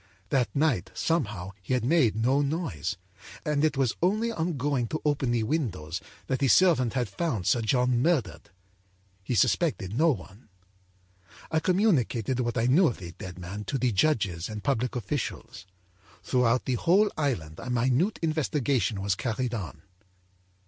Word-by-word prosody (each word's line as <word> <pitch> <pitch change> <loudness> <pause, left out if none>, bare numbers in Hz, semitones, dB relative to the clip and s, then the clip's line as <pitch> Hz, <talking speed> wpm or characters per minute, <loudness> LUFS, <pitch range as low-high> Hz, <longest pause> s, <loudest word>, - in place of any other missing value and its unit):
âThat 130 -3 +3
night, 140 - +1
somehow, 105 - -1
he 130 +7 -1
had 120 -2 -1
made 135 -7 +3
no 130 +6 +2
noise, 140 - -2 0.5
and 150 -1 +1
it 155 -2 +2
was 130 -4 +1
only 215 +6 +1
on 170 -6 -2
going 135 -3 0
to 155 - -4
open 145 -4 +1
the 120 -2 +1
windows 100 - -2 0.2
that 130 - -1
the 140 - +2
servant 140 - +4
had 125 -3 0
found 110 - -2
Sir 120 - +3
John 125 +1 +2
murdered. 130 - 0 0.7
He 120 - -2
suspected 110 - +1
no 165 +6 +4
one. 105 - -5 1.0
âI 160 - +1
communicated 145 - +1
what 120 -1 -1
I 115 - +2
knew 155 +9 +5
of 120 - -2
the 85 -2 -8
dead 90 -1 -9
man 95 +4 -6
to 135 - -2
the 125 -1 +1
judges 100 - +1
and 105 -1 -6
public 125 -3 0
officials. 100 -4 -4 0.6
Throughout 125 +3 +2
the 130 - 0
whole 200 +4 +4
island 95 - -2
a 125 - -7
minute 130 - +1
investigation 140 - 0
was 100 -1 +1
carried 120 +4 -2
on. 95 - -6
125 Hz, 160 wpm, -27 LUFS, 105-150 Hz, 1.0 s, knew